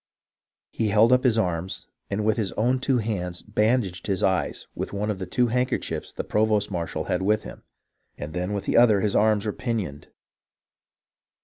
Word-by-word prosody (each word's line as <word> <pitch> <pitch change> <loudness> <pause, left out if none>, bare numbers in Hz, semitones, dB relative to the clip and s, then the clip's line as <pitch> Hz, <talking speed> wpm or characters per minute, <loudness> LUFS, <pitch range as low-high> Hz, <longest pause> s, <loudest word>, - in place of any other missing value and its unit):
He 110 - -1
held 110 +4 +5
up 125 - +3
his 120 -4 +3
arms, 90 -3 -2 0.2
and 105 +1 -1
with 110 -1 +2
his 105 -4 -1
own 125 +4 +1
hands 105 -10 -1
bandaged 105 -4 0
his 95 -2 0
eyes 95 -1 0
with - - -5
one 105 +2 -1
of 100 - -5
the 95 - -5
two 120 +6 +1
handkerchiefs 125 +2 -1
the - - -5
provost 105 -1 +1
marshal 85 -3 -3
had 90 - -1
with 105 +3 +1
him, - - -10 0.6
and 75 +2 -6
then 90 +3 -2
with 100 - -3
the - - +1
other 110 -4 +6
his 105 0 0
arms 105 -1 +3
were 105 - -1
pin 120 -2 -2
ioned. 75 -9 -5
105 Hz, 185 wpm, -25 LUFS, 95-115 Hz, 0.6 s, other